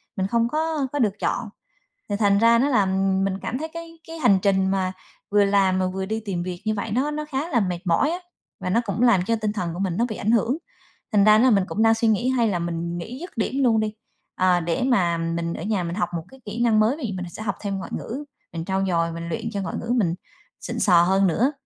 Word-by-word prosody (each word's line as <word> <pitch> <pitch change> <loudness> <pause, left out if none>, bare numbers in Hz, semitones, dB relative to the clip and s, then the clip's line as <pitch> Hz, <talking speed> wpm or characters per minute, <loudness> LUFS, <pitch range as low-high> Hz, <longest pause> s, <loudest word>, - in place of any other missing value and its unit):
mình 190 0 -1
không 230 +2 +1
có 310 +1 -1
có 290 - -1
được 215 -6 +2
chọn. 220 - -1 0.6
Thì 205 - 0
thành 200 -1 +3
ra 230 +2 +5
nó 270 - +3
làm 195 -4 +2
mình 195 -1 -1
cảm 250 - -3
thấy 315 +4 -4
cái 335 0 -6
cái 330 0 -17
cái 330 0 -7
hành 205 -9 +4
trình 190 -1 +2
mà 190 -1 0 0.4
vừa 205 0 +5
làm 195 -2 +3
mà 185 - +1
vừa 190 +1 -3
đi 220 +3 -2
tìm 180 -4 -2
việc 180 -1 -6
như 215 - +1
vậy, 215 +1 -4
nó 265 +7 0
nó 300 0 -3
khá 300 +2 -3
là 245 - +2
mệt 180 -4 -1
mỏi 185 - +2
á, 345 - -2 0.4
và - - -3
nó 225 +6 +2
cũng 205 +2 -2
làm 235 -6 +5
cho 230 - +1
tinh 215 -2 -2
thần 180 -6 -3
của 175 - -6
mình 185 -3 -1
nó 235 - +2
bị 215 - -4
ảnh 215 - 0
hưởng. 235 +4 +2 0.6
Thành 205 -2 +5
ra 215 0 +7
ná 230 - +4
là 260 - +5
mình 200 -4 +3
cũng 220 - -1
đang 225 0 +5
suy 225 0 +1
nghĩ 220 +3 +2
hay 245 -3 +2
là 185 -4 0
mình 170 0 -3
nghỉ 230 +9 -7
dứt 355 - -9
điểm 260 +5 -1
luôn 225 -3 +4
đi, 215 -1 -1 0.4
ờ, 185 -1 +3
để 170 +6 -1
mà 175 -10 +2
mình 165 0 -2
ở - - -6
nhà 205 -3 0
mình 170 0 -4
học 185 -3 0
một 165 - -5
cái 265 0 -16
kỹ 225 +3 -3
năng 225 -3 +4
mới 225 +6 +3
vì 240 -10 -4
mình 180 - -4
sẽ 215 - -8
học 200 -3 -1
thêm 200 -2 -3
ngoại 190 - -7
ngữ, 270 +6 -5 0.3
mình 165 -1 -4
trau 190 +1 0
dồi, 165 -2 +1
mình 170 0 -6
luyện 170 - -3
cho 200 - -2
ngoại 190 - -4
ngữ 230 - -6
mình 180 -8 +1 0.5
xịn - - -5
sò 175 -4 +5
hơn 190 +2 +3
nữa. 235 - +2
205 Hz, 275 wpm, -23 LUFS, 185-235 Hz, 0.6 s, ra